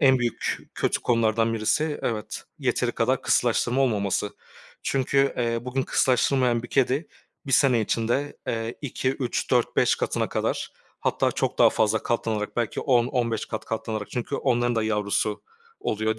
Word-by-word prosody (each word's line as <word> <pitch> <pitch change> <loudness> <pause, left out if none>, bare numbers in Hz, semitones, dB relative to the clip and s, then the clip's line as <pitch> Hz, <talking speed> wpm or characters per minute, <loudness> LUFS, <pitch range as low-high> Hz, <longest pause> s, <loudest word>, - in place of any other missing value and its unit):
en 130 -2 +5
büyük 120 -2 -1 0.2
kötü - - 0
konulardan 115 -1 +2
birisi, 145 +8 0
evet, 110 -3 -3
yeteri - - 0
kadar - - +1
kısırlaştırma 125 +3 +2
olmaması. 105 -5 +1 0.5
Çünkü, 135 +1 +1
eee, 115 -1 0
bugün 130 +2 -1
kısırlaştırılmayan 125 -1 +2
bir 120 - -8
kedi 135 +4 +1 0.4
bir 135 - -3
sene 125 -1 +5
içinde, 120 +6 -1
eee, 115 +1 -3
2-3-4-5 130 -2 +1
katına - - -1
kadar, - - -2 0.3
hatta - - +1
çok - - -2
daha - - +7
fazla 110 0 +1
katlanarak, 110 -3 -2
belki 120 -3 -1
10-15 120 -3 +1
kat 110 - -5
katlanarak 110 -2 -4
çünkü 125 +3 -3
onların 120 -2 +1
da 110 - +2
yavrusu 105 -1 0 0.4
oluyor, 110 +1 -1
120 Hz, 135 wpm, -25 LUFS, 110-130 Hz, 0.5 s, daha